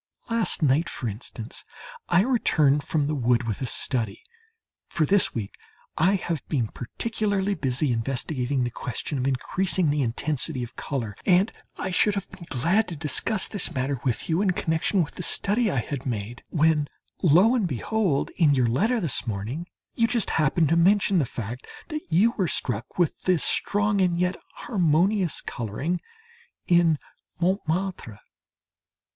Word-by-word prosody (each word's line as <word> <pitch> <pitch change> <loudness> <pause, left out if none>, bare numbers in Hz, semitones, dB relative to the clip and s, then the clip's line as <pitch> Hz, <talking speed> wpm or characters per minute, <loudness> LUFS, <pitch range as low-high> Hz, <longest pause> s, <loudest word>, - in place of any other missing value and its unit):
Last 230 -7 +2
night, 150 +4 +3
for 120 - -5
instance, 110 +1 -6 0.5
I 175 +1 +5
returned 155 - +3
from 150 0 0
the 150 - -1
wood 125 -3 +2
with 110 -1 -3
a 130 - -1
study 120 - -2 0.6
for 155 - 0
this 195 +3 +2
week 105 -4 -4 0.4
I 185 +5 +3
have 170 -6 -2
been 125 -8 -1
particularly 205 - -2
busy 135 -4 0
investigating 130 +2 -1
the 120 - -2
question 125 +4 -4
of 130 - 0
increasing 175 +5 +1
the 145 0 0
intensity 135 +2 -1
of 120 - -9
colour 115 -8 -4
and 190 +3 +3 0.3
I 185 - -3
should 205 +3 +3
have 200 -1 -3
been 170 -3 -12
glad 170 - +1
to 175 - -6
discuss 175 - +1
this 205 -4 0
matter 130 0 -1
with 125 -4 -1
you 165 +3 +1
in 195 -3 +2
connection 165 +3 +1
with 145 - -8
the - - -4
study 210 +5 +2
I 135 -9 0
had 135 +1 -5
made, 115 0 -4
when 155 -2 +2 0.3
lo 180 - +5
and 225 -7 +1
behold! 170 - 0
in 150 -5 +4
your 130 -2 +3
letter 220 - +1
this 145 - -1
morning, 115 - -4 0.3
you 230 - +2
just 235 -2 0
happen 160 +2 +2
to 160 - +2
mention 195 +2 +4
the 140 - 0
fact 120 +2 -6 0.2
that 305 -1 -3
you 200 +8 +4
were 185 - +2
struck 120 -5 -3
with 175 -4 +1
the 185 -1 +4
strong 205 +5 +1
and 175 -2 +2
yet 180 +1 +1 0.3
harmonious 185 - +1
colouring 135 - -3 0.6
in 170 -3 +4 0.4
Montmartre. 180 - -1
160 Hz, 160 wpm, -25 LUFS, 130-190 Hz, 0.6 s, I